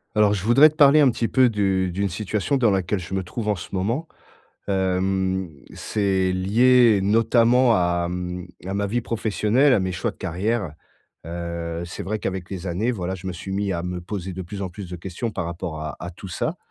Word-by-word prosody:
Alors 105 -1 +4
je 95 -2 -3
voudrais 135 +7 +7
te 155 - -15
parler 150 -1 +6
un 140 -3 +6
petit 115 -1 -1
peu 130 -2 +4
de 95 -3 +1
d'une 100 +1 -1
situation 105 +7 -1
dans 120 -4 +3
laquelle 95 +1 0
je 90 +2 -8
me 95 - -1
trouve 105 +4 -5
en 105 - +2
ce 85 - -9
moment. 115 - -1 0.6
Hem, 95 -1 0 0.3
c'est 95 -3 0
lié 115 +4 +4
notamment 115 +4 +4
à, 85 -1 +1
mmh, 90 0 -4 0.2
à 95 - -3
ma 100 0 0
vie 120 +4 0
professionnelle, 115 +4 +2
à 125 - +4
mes 95 0 -2
choix 90 - -2
de - - -18
carrière. 95 +1 -2 0.5
Heu, 85 0 -4
c'est 85 - -7
vrai 110 +2 -3
qu'avec 95 -3 -4
les 95 -1 -5
années, 95 +7 0
voilà, 95 -4 -3
je 95 0 -9
me - - -3
suis 90 +2 -7
mis 100 0 -1
à 85 -1 -3
me 90 0 -4
poser 95 0 -5
de 95 +1 -5
plus 100 +3 -7
en 95 - -2
plus 90 0 -9
de 90 - -5
questions 95 +6 -4
par 105 - -4
rapport 85 -2 -5
à 75 0 -5
à 85 - -5
tout 95 +2 -10
ça 155 - -2
95 Hz, 215 wpm, -23 LUFS, 90-110 Hz, 0.6 s, voudrais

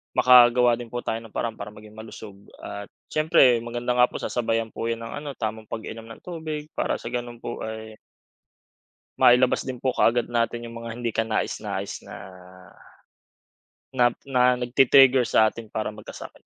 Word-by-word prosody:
Makagawa 125 -1 +6
din 120 -1 -9
po 120 - -3
tayo 115 -1 -4
ng 115 - -13
paraan 115 +1 -3
para 105 0 -8
maging 105 0 -14
malusog 110 -2 -10 0.2
at 100 0 -8 0.2
siyempre 145 -7 +4
maganda 120 +1 -2
nga 125 0 +4
po - - -5
sasabayan 115 -2 -1
po 115 +1 -4
yun 115 - -3
ng 115 - -7 0.2
ano 145 - -5
tamang 110 -1 -4
pag-inom 110 0 -6
ng 115 0 -12
tubig 155 -3 -6
para - - -1
sa - - -8
ganun 120 -1 -5
po 120 - -6
ay 110 0 -7 1.2
mailabas 125 +1 +5
din 130 -2 -5
po 130 - +1
kaagad 120 0 +2
natin 120 0 -1
yung 115 0 -9
mga 115 - -6
hindi 120 -1 -3
kanais-nais 110 0 -3
na - - -10 1.8
na 130 -2 +3 0.2
na 125 -2 +3
nagti-trigger 130 +1 +5
sa 110 -1 +4
atin 115 -2 -10
para 110 0 -3
magkasakit. 105 0 -11
120 Hz, 165 wpm, -24 LUFS, 110-125 Hz, 1.8 s, Makagawa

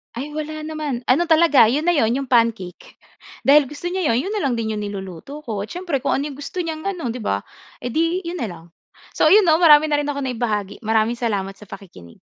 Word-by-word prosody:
Ay 275 +5 -5
wala 310 0 -5
naman. 305 -5 -4
Ano 340 +6 +2
talaga 320 -7 +5
'yon 275 +7 0
na 350 - +3
'yon 240 -8 +2
'yong 265 - -13
pancake. 230 -7 0 0.5
Dahil 285 0 +5
gusto 300 +6 -6
niya 370 -3 -1
'yon, 245 +5 +1
'yon 390 - -4
na 425 - -1
lang 250 - 0
din 225 -1 -2
'yong 215 - -3
niluluto 205 - -7
ko, 220 -7 -4
siyempre 345 - -3
kung 275 - 0
ano 290 +2 -3
'yong 275 - -11
gusto 350 +5 -4
niyang 320 +2 -5
ano 335 -12 -3
'di 250 - -6
ba, 100 - -2 0.4
eh 245 - -3
di 330 +6 0
'yon 340 +1 -5
na 230 - -2
lang. 170 -3 -10 0.5
So - - +2
'yon 410 +6 +6
'no, 320 -3 +4
marami 310 -2 +6
na 290 - +2
rin 290 - -2
akong 280 -1 -3
naibahagi. 225 -6 -3
Maraming 225 +1 0
salamat 200 -5 -2
sa 210 - -14
pakikinig. 90 - -12
275 Hz, 230 wpm, -21 LUFS, 220-315 Hz, 0.5 s, yon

